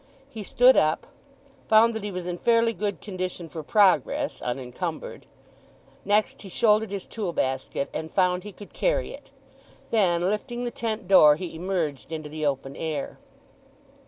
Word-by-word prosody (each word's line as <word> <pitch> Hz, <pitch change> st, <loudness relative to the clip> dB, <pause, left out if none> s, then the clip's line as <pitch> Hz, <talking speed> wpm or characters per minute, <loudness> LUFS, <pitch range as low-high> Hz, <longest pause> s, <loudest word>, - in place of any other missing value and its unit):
He 225 Hz, -, -7 dB
stood 245 Hz, +6 st, +5 dB
up, 155 Hz, +1 st, +2 dB, 0.6 s
found 225 Hz, +1 st, +6 dB
that 220 Hz, -2 st, -5 dB
he 210 Hz, -, -3 dB
was 180 Hz, -1 st, -5 dB
in 175 Hz, -1 st, -4 dB
fairly 230 Hz, -1 st, +3 dB
good 205 Hz, 0 st, -3 dB
condition 185 Hz, -3 st, -5 dB
for 160 Hz, +1 st, -7 dB
progress, 215 Hz, -, +2 dB
unencumbered. 130 Hz, +7 st, -5 dB, 0.8 s
Next 210 Hz, +1 st, +1 dB
he 195 Hz, -, -10 dB
shouldered 215 Hz, +2 st, +2 dB
his 200 Hz, -1 st, -5 dB
tool 200 Hz, -6 st, -4 dB
basket, 130 Hz, 0 st, -2 dB
and 160 Hz, 0 st, -4 dB
found 180 Hz, -1 st, +2 dB
he 210 Hz, -, -8 dB
could 200 Hz, +1 st, -13 dB
carry -, -, 0 dB
it. -, -, -13 dB, 0.6 s
Then 180 Hz, -5 st, +2 dB
lifting 240 Hz, +4 st, -3 dB
the 240 Hz, -, -3 dB
tent 220 Hz, -4 st, -4 dB
door 155 Hz, -6 st, +7 dB
he 170 Hz, +2 st, -6 dB
emerged 165 Hz, -5 st, -3 dB
into 155 Hz, -2 st, -5 dB
the 155 Hz, 0 st, -2 dB
open 135 Hz, -1 st, -3 dB
air. 155 Hz, -3 st, -4 dB
185 Hz, 160 wpm, -25 LUFS, 160-215 Hz, 0.8 s, door